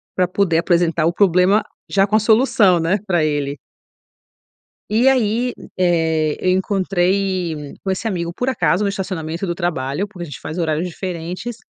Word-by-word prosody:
pra 180 -1 +2
poder 180 -3 +1
apresentar 170 -2 +2
o 170 - +1
problema 190 +2 +3 0.3
já 195 0 +3
com 210 - 0
a - - +5
solução, 215 -4 +4
né, 170 +5 +1
pra 175 -4 +2
ele. 145 -1 -2 1.3
E 230 +5 +4
aí, 245 -1 +1 0.2
eh, 160 -4 +1
eu 185 - +1
encontrei 185 -4 0
com 195 - -2
esse 190 +4 -2
amigo 170 -5 -2
por 250 +6 -1
acaso 205 -6 +1
no - - +1
estacionamento 185 -3 -4
do 175 - -2
trabalho, 160 -1 -2
porque 185 -4 -8
a - - -9
gente 145 -6 -9
faz 155 +3 -6
horários 160 0 0
diferentes, 180 +5 -5
180 Hz, 165 wpm, -19 LUFS, 165-200 Hz, 1.3 s, a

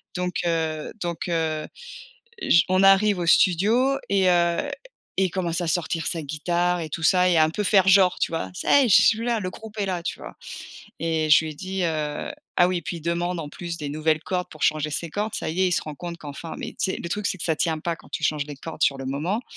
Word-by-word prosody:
Donc 180 0 -2
heu 160 -2 -1
donc 175 +2 -3
heu, 160 -2 -1 0.7
j 170 - +5
on 185 +1 +3
arrive 195 +1 +5
au 175 - -1
studio 220 +11 +3
et 190 -2 +3
heu, 175 +9 +2 0.5
et 190 - +3
il 185 - -1
commence 175 -2 -1
à 170 - -2
sortir 165 0 -1
sa 165 - -1
guitare 175 +4 -1
et 155 - -5
tout 165 - -5
ça, 180 +1 +4
et 170 - +3
un 155 0 +5
peu 210 +6 -3
faire 195 -1 +4
genre, 190 -1 +5
tu - - 0
vois? 130 - -3
Ça 280 - +3
y - - +3
est, - - 0
je 190 - +7
suis 225 0 +3
là! 235 -2 +1
Le 185 -3 -3
groupe 220 +3 -11
est 200 - 0
là, 180 -2 -3
tu - - -4
vois? - - -10 0.7
Et 160 -1 0
je 160 +1 +6
lui 155 - -4
ai - - -15
dit, 190 +1 -4
heu 155 -3 -2 0.3
ah 175 0 +6
oui, 185 - 0
et 170 - -8
puis, 170 - -5
il - - -8
demande 175 +2 -1
en 150 -3 -6
plus, 170 +1 -6
des 145 -3 -5
nouvelles 155 +1 0
cordes 180 -1 -3
pour 155 - -12
changer 155 -1 +2
ses 155 +2 -3
cordes. 210 +3 -3
Ça - - -3
y 175 +4 -2
est, 185 - +4
il - - -2
se - - +1
rend 155 -1 -7
compte 170 +3 -7
qu’enfin, 150 +1 -8
mais - - -5
tu 190 - -2
sais, - - -3
le - - -5
truc, 210 +1 -2
c'est - - -1
que - - -4
ça 160 - +1
tient 160 0 -1
pas 165 +1 -3
quand - - -18
tu - - -4
changes 150 -1 0
les 145 -2 -8
cordes 160 +2 -9
sur 140 - +3
le 135 - -7
moment 160 - -2
170 Hz, 265 wpm, -24 LUFS, 155-185 Hz, 0.7 s, je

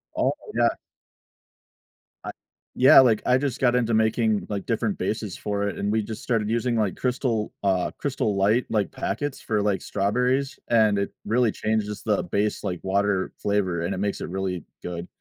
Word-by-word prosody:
Oh, - - +2 0.2
yeah. - - +3 1.5
I - - -4 0.4
yeah, 130 - +8
like, 115 -4 +3
I 125 - +4
just 135 -2 -2
got 125 -2 +3
into 115 -2 +1
making, 110 -1 +2
like, 100 -2 -3
different 115 -3 -1
bases 100 0 -3
for 100 -1 -2
it, - - -4
and 100 - -1
we 110 0 +2
just 110 +1 -7
started 115 -4 0
using, 120 +1 0
like, 105 -4 0
crystal, 125 -4 -1
uh, 95 -3 +1
Crystal 130 -7 -1
Light, 105 +6 +3
like 105 -3 0
packets 140 +1 -3
for, 105 -2 0
like, 100 -3 0
strawberries, 125 +7 0
and 110 -3 +4
it 100 0 -2
really 115 +1 +2
changes 105 -1 -2
the 105 -5 0
base, 100 +4 -1
like, 90 -2 -3
water 100 0 0
flavor, 95 -4 0
and 90 +3 -1
it - - -4
makes 100 +1 -2
it - - -4
really 95 -3 -3 0.2
good. 85 0 -5
105 Hz, 180 wpm, -25 LUFS, 100-120 Hz, 1.5 s, yeah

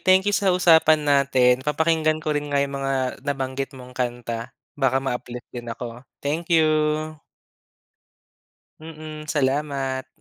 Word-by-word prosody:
thank 185 +1 +4
you 205 - +2
sa 200 -2 +2
usapan 160 -3 +5
natin. 135 -3 +3
Papakinggan 155 +1 +1
ko 155 - 0
rin 145 0 -2
nga 140 - +1
'yong 140 0 -3
mga 135 0 -1 0.3
nabanggit 135 -1 -2
mong 125 0 -11
kanta. 120 -1 -3 0.2
Baka 135 -3 +1
ma-uplift 125 -2 -5
din 120 -1 -6
ako. 120 +1 -7 0.2
Thank 160 +4 -2
you. 160 -2 +5 2.1
Mm, 155 -1 -9
salamat. 135 -2 -1
140 Hz, 130 wpm, -23 LUFS, 130-155 Hz, 2.1 s, usapan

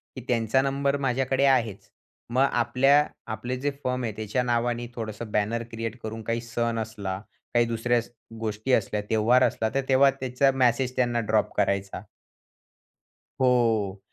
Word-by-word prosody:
की 130 - -6
त्यांचा 115 +1 +2
नंबर 140 +1 0
माझ्याकडे 135 0 +1
आहेच, 115 -7 +1 0.4
मग 130 +2 +4
आपल्या 130 +5 +3 0.3
आपले 120 +4 -3
जे 145 +2 -1
फर्म 125 0 -1
आहे, 115 - -1
त्याच्या 110 +3 -1
नावाने 120 0 0
थोडंसं 110 -1 -6
बॅनर 110 +3 0
क्रिएट 115 +1 -4
करून 110 +1 -5
काही 115 +1 -2
सण 115 0 -2
असला, 100 -4 -4 0.3
काही 120 -1 +4
दुसऱ्या 115 +1 +1
स 120 - -14 0.3
गोष्टी 110 +3 -3
असल्या, 105 -1 +1
सण-त्यौहार 110 +4 +3
असला, 110 -3 +1
तर 135 - +2
तेव्हा 135 +1 +6
त्याचा 130 +1 +2
मेसेज 130 0 +1
त्यांना 120 -2 +1
ड्रॉप 110 -1 0
करायचा. 100 0 0 1.4
हो, 115 -6 +2
120 Hz, 150 wpm, -26 LUFS, 110-130 Hz, 1.4 s, तेव्हा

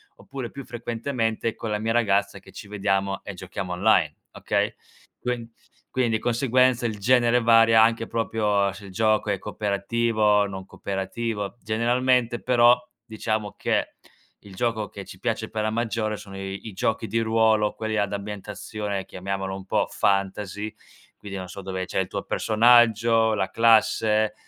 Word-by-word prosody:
oppure 130 -3 -7
più 140 - -8
frequentemente 115 -1 -2
con 110 - -5
la 105 - 0
mia 110 +1 -1
ragazza, 100 -4 +1
che - - -17
ci - - -10
vediamo 100 -1 -1
e 100 - -7
giochiamo 90 0 -6
online, 90 -5 +3 0.2
okay, - - -1 0.5
quin 120 -2 -4 0.4
quindi 125 -3 +1
di - - 0
conseguenza 125 0 +2
il 105 -3 -2
genere 120 +1 +3
varia 115 -1 +6
anche 115 0 +1
proprio 105 -3 0
se 100 +1 -11
il 95 - -10
gioco 110 +2 +1
è 100 - +1
cooperativo, 105 +1 +1
non 95 -1 -7
cooperativo, 100 +3 -4
generalmente 120 +2 +1
però 120 -1 +5 0.3
diciamo 110 -2 -3
che - - -1 0.5
il 100 -2 -13
gioco 115 -1 -1
che 100 - -9
ci 95 - -12
piace 110 0 -2
per 110 -1 -2
la 110 - +1
maggiore 110 -1 -1
sono 100 -2 -10
i 95 0 -6
i - - -11
giochi 110 +3 -1
di 115 +3 0
ruolo, 110 -1 +2
quelli 110 0 -3
ad 100 -1 0
ambientazione, 105 0 -5
chiamiamolo 95 +1 -4
un 95 0 -7
po' - - +1
fantasy, 100 +1 -1 0.4
quindi 100 -1 -7
non 95 -1 -7
so 100 - -8
dove 95 -1 -4
c'è - - -2
il - - 0
tuo - - -4
personaggio, 115 0 +4
la 95 -2 -1
classe, 110 -1 +3
110 Hz, 160 wpm, -25 LUFS, 100-115 Hz, 0.5 s, varia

